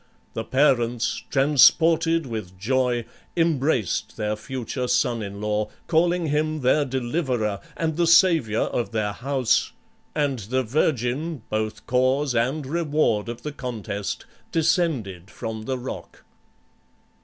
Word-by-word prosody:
The 115 - -3
parents, 120 -3 +1
transported 160 +3 +4
with 105 -7 -6
joy, 120 +2 0 0.3
embraced 145 - 0
their 105 -1 -1
future 125 +2 -4
son 125 -2 +1
in 100 -1 -6
law, 105 0 -1 0.2
calling 170 +1 +2
him 155 +1 0
their 135 +4 +3
deliverer 125 - -1 0.2
and 160 -2 -1
the 170 -1 +2
savior 165 - +4
of 120 -1 -2
their 105 -2 0
house, 130 +1 0 0.4
and 140 -4 0
the 125 +6 -1
virgin 135 +2 -1
both 110 0 -2
cause 130 +3 +2
and 130 +6 0
reward 145 -8 0
of 120 0 -7
the 150 - -3
contest, 110 -7 -5 0.3
descended 140 - 0
from 110 0 -6
the 130 +1 -2
rock. 125 +1 -8
130 Hz, 120 wpm, -24 LUFS, 110-150 Hz, 0.4 s, transported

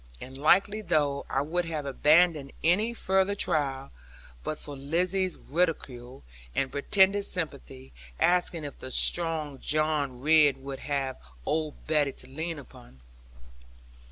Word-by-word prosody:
And 130 +1 -10
likely 190 +9 +3
enough 150 -8 0
I 135 - 0
would 175 +4 -1
have 155 -3 -4
abandoned 150 +1 +3
any 200 +8 +3
further 190 -3 +1
trial, 135 - -1 0.5
but 155 - -3
for 145 -1 -8
Lizzie's 180 +6 0
ridicule, 135 -6 -3 0.3
and 135 -1 0
pretended 190 +7 +3
sympathy; 65 - -5 0.3
asking 175 -2 +2
if 145 -2 -8
the 130 - -7
strong 155 -1 +1
John 150 -4 -1
Ridd 150 0 +5
would 135 0 -7
have 135 -2 -3 0.3
old 155 -1 -2
Betty 150 -3 +1
to 125 - -11
lean 160 +5 -5
upon. 65 - -14
150 Hz, 130 wpm, -28 LUFS, 135-175 Hz, 0.5 s, Ridd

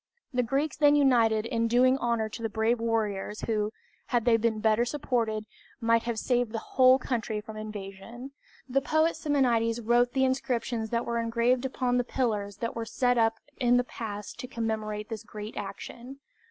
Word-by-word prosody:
The 250 - +2
Greeks 275 +5 -1
then 290 -1 +5
united 230 -6 +4
in 230 0 0
doing 250 +3 +4
honor 235 -3 0
to 225 +2 -8
the 225 - -1
brave 220 +3 +1
warriors 215 -3 -1
who, 215 -2 -1 0.4
had 240 -2 0
they 240 -2 +5
been 225 -1 +1
better 220 +1 +3
supported, 235 -5 -1 0.3
might 230 -1 +3
have 235 -2 -2
saved 245 0 0
the - - -1
whole 255 +3 +4
country 230 -4 -2
from 220 +1 -9
invasion. 215 +4 -8 0.4
The 275 +1 +1
poet 315 +3 +2
Simonides 240 -6 +1
wrote 240 +2 +2
the 265 -1 +3
inscriptions 240 -3 -1
that 235 +1 -1
were 235 0 -1
engraved 235 +2 +1
upon 255 -1 0
the 245 - +2
pillars 210 -6 -2
that 230 +2 -3
were 230 - -2
set 245 +2 +1
up 225 0 +3 0.2
in 245 -1 +3
the 245 - +3
pass 210 -4 -6
to 250 - -8
commemorate 215 -3 -3
this 220 -3 -5
great 215 0 -8
action. 240 +6 -7
230 Hz, 180 wpm, -28 LUFS, 220-250 Hz, 0.4 s, then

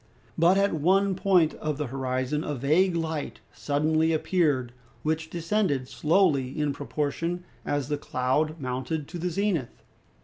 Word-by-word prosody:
But 175 +4 +4
at 200 0 +2
one 190 +5 +3
point 180 -4 +3
of 155 -2 -3
the 150 - -2
horizon 130 +3 -2
a 150 - -3
vague 160 +8 +2
light 160 -2 -3
suddenly 155 +3 +1
appeared, 150 -7 +1 0.3
which 160 +1 -1
descended 170 -6 0
slowly 150 -4 +1
in 150 -1 +1
proportion 155 +5 -3 0.2
as 145 -3 -1
the 145 -1 -2
cloud 145 +5 0
mounted 130 +3 -3
to 175 +1 -6
the 180 +2 -1
zenith. 175 - -2
155 Hz, 140 wpm, -27 LUFS, 140-175 Hz, 0.3 s, But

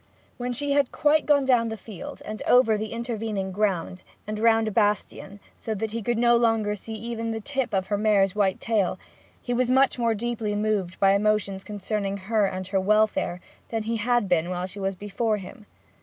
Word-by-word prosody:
When 245 0 -3
she 285 +4 -2
had 280 -2 +2
quite 305 0 +2
gone 285 -2 +4
down 240 -3 +3
the 220 - -5
field, 205 -2 -9
and 215 0 -6
over 245 -3 +5
the 215 0 -4
intervening 225 -4 -3
ground, 185 -2 -1 0.2
and 215 0 -4
round 225 0 +4
the 215 - -2
bastion, 205 -1 -1 0.2
so 220 - -3
that 220 +1 -3
he 230 +1 -3
could 240 +2 -1
no 240 0 +4
longer 225 -3 +2
even 225 +2 -5
see - - -1
the 225 - -3
tip 265 +3 -2
of 190 -2 0
her 205 +1 -1
mare's 200 -3 +3
white 195 -3 +1
tail, 210 -5 0 0.5
he 245 - -2
was 245 0 +1
much 265 0 +3
more 230 -1 +2
deeply 225 -1 -2
moved 205 -4 -1
by 195 0 +5
emotions 200 -1 +1
concerning 200 0 -3
her 205 +1 +1
and 185 0 -5
her 195 - +1
welfare 210 -3 +1 0.3
than 225 -1 -2
he 230 +1 -1
had 240 0 +1
been 175 -1 +1
while 180 0 -2
she 190 +2 -9
was 195 0 -2
before 205 +3 -1
him. 205 +2 -11
215 Hz, 200 wpm, -25 LUFS, 195-230 Hz, 0.5 s, over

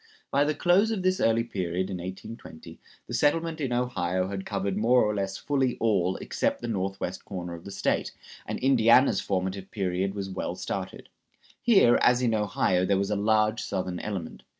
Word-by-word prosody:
By 140 +1 +3
the 150 0 0
close 185 +5 +3
of 215 -5 -2
this 185 0 +1
early 115 +1 +3
period, 95 -3 -3
in 95 - -3
1820, 90 -2 -9 0.3
the - - -8
settlement 160 +5 +1
in 135 -3 -1
Ohio 95 -7 -1
had 95 -1 -5
covered 100 -2 -2
more 120 +4 +4
or 105 - 0
less 95 -1 -2
fully 135 -3 0
all 95 -5 +1
except - - -2
the 120 - -5
northwest 95 -3 -3
corner 90 -3 -6
of 85 0 -10
the - - -7
State, 100 0 -1 0.4
and - - -3
Indiana's 125 -3 +4
formative 95 0 -3
period 95 -1 -2
was 100 -1 -4
well 95 -1 -4
started. - - -5 0.5
Here, 195 - +5
as 125 0 +4
in 115 -2 +2
Ohio, 100 -4 +1
there 100 +1 +2
was 100 +1 -1
a - - +1
large 110 +2 +2
Southern 90 -2 -3
element. 95 -6 -5
100 Hz, 180 wpm, -27 LUFS, 95-125 Hz, 0.5 s, Here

